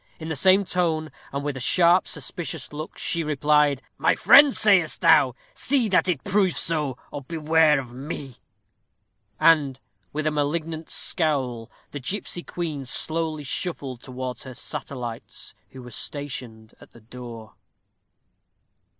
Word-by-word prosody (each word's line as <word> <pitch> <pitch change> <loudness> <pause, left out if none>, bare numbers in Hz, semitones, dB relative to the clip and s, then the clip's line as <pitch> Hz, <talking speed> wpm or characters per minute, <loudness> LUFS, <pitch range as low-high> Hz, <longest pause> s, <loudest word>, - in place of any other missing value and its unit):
In 160 0 -6
the 160 - -2
same 190 +6 +4
tone, 160 -4 -1 0.2
and 140 +1 -3
with 145 -1 -2
a - - -5
sharp, 175 +7 +4
suspicious 165 -3 -5
look, 155 +2 -7
she 170 -1 -1
replied, 150 -2 +2 0.2
"My - - +3
friend, 285 0 +7
sayest 195 -7 +3
thou? - - +5 0.2
See 275 - +2
that 185 -1 +3
it 165 -7 -1
prove 195 -2 +1
so, 150 -6 0
or 145 - -5
beware 155 0 +3
of 125 -3 -8
me." 135 -1 -7 1.0
And, 145 -5 +4 0.3
with 155 +1 -3
a 155 - +2
malignant 155 +2 -2
scowl, 130 -9 0 0.2
the 145 - -5
gipsy 180 +4 -3
queen 160 -6 -4
slowly 155 +3 -1
shuffled 135 -4 -4
towards 130 -1 -6
her 130 -2 -9
satellites, 120 -3 -6 0.2
who 130 -1 -11
were 125 - -11
stationed 120 -5 -5
at - - -16
the 120 - -16
door. 115 -1 -10
150 Hz, 140 wpm, -24 LUFS, 130-165 Hz, 1.0 s, friend